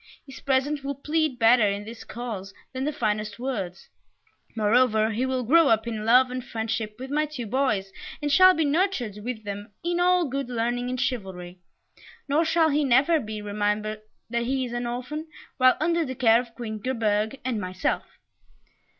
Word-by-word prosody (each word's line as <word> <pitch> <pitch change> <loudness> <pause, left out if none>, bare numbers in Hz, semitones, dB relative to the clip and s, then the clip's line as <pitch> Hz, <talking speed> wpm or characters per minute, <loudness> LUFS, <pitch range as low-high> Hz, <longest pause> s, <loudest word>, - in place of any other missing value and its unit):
His 270 - -11
presence 275 +1 0
will 280 0 -3
plead 300 -1 -1
better 225 -2 +5
in 200 +1 -3
his 225 +1 -9
cause 215 -5 -6 0.2
than 260 +1 -3
the 300 - 0
finest 215 -5 -2
words; 210 -8 -4 0.7
moreover, 220 0 +3
he 245 +5 -1
will 260 -1 -1
grow 320 +6 +5
up 220 -2 +3
in 220 -2 -4
love 250 +2 +5
and 255 0 -4
friendship 220 -3 -3
with 260 +2 -8
my 305 +1 +1
two 280 -6 -6
boys, 215 -5 0 0.3
and 295 -1 -2
shall 370 +4 +7
be 320 - +1
nurtured 285 - 0
with 235 -2 -5
them 205 +1 -6
in 345 +1 0
all 360 -1 +3
good 275 -1 -3
learning 245 +1 -1
and 255 0 -3
chivalry, 190 -8 -4 0.7
nor 290 +4 +2
shall 320 0 +3
he 285 -2 +1
ever 280 +6 +5
be 215 -4 -6
reminded 210 +1 -2 0.3
that 235 0 0
he 260 +1 0
is 240 - -7
an 240 0 -2
orphan 255 +7 -5 0.3
while 255 -1 +5
under 335 +2 +1
the 260 -3 -5
care 230 -2 +5
of 235 -2 -14
Queen 220 -3 -5
Gerberge 220 0 -1
and 235 -5 -1
myself." 185 0 -3
245 Hz, 180 wpm, -25 LUFS, 215-275 Hz, 0.7 s, shall